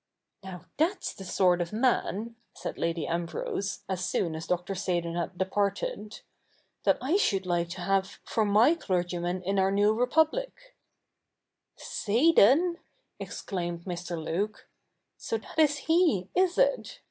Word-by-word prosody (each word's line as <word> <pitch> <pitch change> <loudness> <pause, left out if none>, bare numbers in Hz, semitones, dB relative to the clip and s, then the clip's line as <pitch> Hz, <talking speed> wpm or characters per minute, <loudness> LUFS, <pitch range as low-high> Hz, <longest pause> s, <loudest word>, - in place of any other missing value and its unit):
'Now, 180 -3 -9
that's 340 +7 0
the 195 - -10
sort 180 -1 +2
of 170 - -3
man,' 230 -1 0 0.2
said - - -6
Lady 165 0 -1
Ambrose, 170 +3 -3
as 185 -2 -2
soon 175 -2 -1
as 160 +1 -6
Dr. 180 +2 -1
Seydon 175 -3 -2
had 175 +1 -3
departed, 200 +2 -2 0.3
' - - -40
that - - +4
I 290 +9 +1
should 195 - +1
like 175 -1 0
to 180 +1 -7
have 195 +1 0
for 225 - 0
my 215 +8 +5
clergyman 175 - -2
in 195 +2 0
our 190 0 +3
new 205 +2 +3
Republic' 320 - 0 0.5
' - - -58 0.2
Seydon! 310 - +4 0.2
' - - -46
exclaimed 175 -3 -5
Mr. 175 -1 -4
Luke, 180 +7 -3 0.3
' - - -53
so 455 - -2
that 325 - -8
is 295 -2 +4
he, 320 - +2
is 365 -1 +2
it - - +1
195 Hz, 150 wpm, -28 LUFS, 175-265 Hz, 0.5 s, my